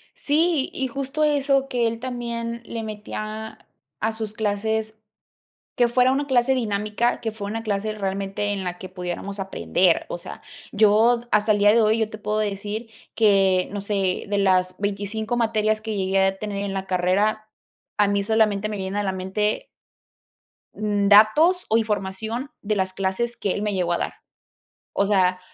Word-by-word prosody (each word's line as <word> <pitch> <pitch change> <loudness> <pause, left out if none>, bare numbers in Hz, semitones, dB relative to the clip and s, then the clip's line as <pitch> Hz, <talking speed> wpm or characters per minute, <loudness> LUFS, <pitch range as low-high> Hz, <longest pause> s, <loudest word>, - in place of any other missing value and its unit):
Sí, 310 -1 +1
y 265 - -2
justo 275 +4 -2
eso, 275 -2 +2
que 245 -3 +1
él 230 0 -3
también 235 -2 -4
le 230 0 -5
metía 215 0 -6 0.3
a 220 - 0
sus 220 -1 -5
clases, 220 0 -1 0.8
que 245 -2 +3
fuera 250 +2 +3
una 280 +2 -1
clase 260 0 +3
dinámica, 215 0 0
que 225 -2 -3
fue 205 -2 -6
una 225 +2 -4
clase 210 0 -1
realmente 200 0 -2
en 200 -1 -3
la 180 -1 -4
que 185 - -8
pudiéramos 185 +2 -5
aprender, 85 - +1
o - - -4
sea, - - -10 0.3
yo 220 +3 +4
hasta 210 +1 +3
el 210 - +4
día 205 +1 +6
de 230 +1 +4
hoy 215 +1 +3
yo 220 -1 +1
te 215 - -9
puedo 210 0 -2
decir 210 +2 -3 0.3
que, 195 -4 +4
no 205 - -3
sé, 195 -2 -1
de 205 0 0
las 185 -2 +2
25 205 +3 -2
materias 215 -2 +1
que 215 -1 -4
llegué 190 0 +2
a 195 0 0
tener 205 -1 -4
en 200 - -3
la 195 0 -3
carrera, 200 +4 +1 0.5
a 210 - +4
mí 200 0 +1
solamente 215 -1 +2
me 215 - -4
vienen 190 0 -4
a 205 - +1
la 195 - 0
mente 200 - -1 1.1
datos 215 - +4
o 220 - +4
información 220 +4 -2
de 215 0 -1
las 190 -1 -1
clases 195 +5 -2
que 200 - -1
él 200 - -2
me 210 -1 -1
llegó 180 -2 0
a - - +1
dar, - - -3 0.8
o 200 - +1
sea, 185 -3 +2
210 Hz, 175 wpm, -23 LUFS, 195-230 Hz, 1.1 s, día